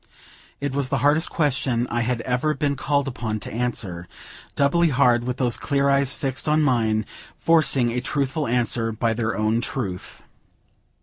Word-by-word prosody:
It 140 -1 -3
was 140 -2 -1
the 135 - 0
hardest 155 +3 +3
question 130 -6 0
I 120 - 0
had 115 0 -1
ever 125 +6 0
been 145 -2 -1
called 140 +1 0
upon 110 -4 -3
to - - -7
answer; 105 -7 -3 0.5
doubly 165 +4 +3
hard 125 -4 +3
with 125 0 -3
those 125 -3 0
clear 140 -1 +1
eyes 140 0 +2
fixed 135 0 -2
on 155 +1 +3
mine, 110 -6 +1 0.3
forcing 145 -7 +3
a 125 +1 -2
truthful 140 +2 -1
answer 115 -1 0
by 115 +1 0
their 110 -2 -2
own 110 +2 +1
truth. 100 -8 -5
125 Hz, 165 wpm, -23 LUFS, 115-140 Hz, 0.5 s, hardest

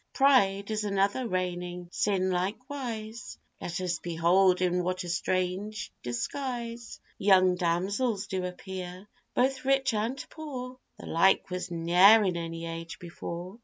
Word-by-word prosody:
Pride 210 -8 +3
is 215 0 -1
another 200 +4 +1
reigning 180 -2 -3
sin 190 -2 +1
likewise; 225 +3 -4 0.2
Let 170 0 -3
us 175 -2 -1
behold 175 +2 +3
in 180 0 +1
what 185 +1 -2
a 175 - -6
strange 185 +5 -2
disguise 235 - -4 0.2
Young 185 -2 +5
damsels 195 +5 0
do 190 -2 -3
appear, 180 +1 -6 0.3
both 260 +1 +1
rich 270 -2 +2
and 220 +5 -1
poor; 255 -5 -7 0.2
The - - -10
like 185 +2 +3
was 180 +1 -3
ne'er 180 +6 +6
in 185 -3 0
any 165 0 -4
age 165 0 -6
before. 175 +3 -7
190 Hz, 130 wpm, -29 LUFS, 180-225 Hz, 0.3 s, ne'er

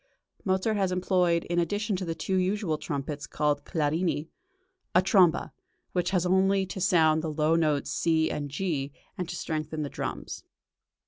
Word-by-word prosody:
Mozart 190 +3 +1
has 190 -2 +1
employed, 180 -2 +2
in 175 0 -1
addition 205 +4 0
to 185 - -4
the 165 -1 -3
two 165 +4 -2
usual 185 -4 0
trumpets 145 0 -4
called 145 -1 0
"clarini," 160 0 0 0.7
a 180 - +7
tromba, 185 -4 +4 0.4
which 180 -1 0
has 185 -2 +1
only 190 +1 +3
to 190 +1 -6
sound 160 -4 +4
the 160 -1 -3
low 155 +1 +2
notes 155 -4 +1
C 160 -1 +2
and 145 -1 -3
G, 145 -3 -2 0.2
and 180 -2 -4
to 175 - -4
strengthen 155 -2 -3
the 145 - -4
drums. - - -5
170 Hz, 165 wpm, -28 LUFS, 155-185 Hz, 0.7 s, a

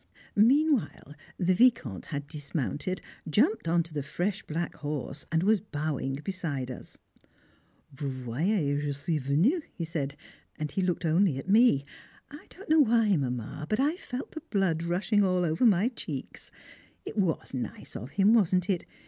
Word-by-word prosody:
Meanwhile 255 - +3 0.2
the 185 +1 +2
Vicomte 180 - +2
had 145 -2 -4
dismounted, 150 +4 -3 0.3
jumped 220 - +2
on 170 +1 +3
to 165 -1 -10
the 145 - -2
fresh 175 +8 -2
black 165 +2 -4
horse, 145 -1 -5
and 165 +1 +2
was 210 +1 +4
bowing 150 -7 -3
beside 150 -9 -3
us. 125 - -10 1.0
"Vous 140 +1 -4
voyez 145 - 0
je 145 -1 -1
suis 150 +3 -1
venu," 160 - +2
he 170 - -3
said, 145 -4 -3 0.4
and 150 -1 -3
he 195 - -1
looked 180 -1 0
only 165 -2 +3
at 135 - -6
me. 205 - +5 0.5
I 295 - -11
don't 390 - -13
know 315 +1 +5
why, 225 -6 +4
Mamma, 130 +1 -3
but 215 - +1
I 295 +5 +2
felt 260 -8 -6
the 315 - -7
blood 190 -6 +1
rushing 185 +5 +1
all 185 -2 +2
over 165 +9 +3
my 205 +2 +4
cheeks; 150 - -7 0.6
it - - -6
was 185 -10 0
nice 130 -2 -5
of 120 - -6
him, 200 +7 +4
wasn't 185 -4 +3
it? 180 - -2
170 Hz, 165 wpm, -29 LUFS, 145-210 Hz, 1.0 s, me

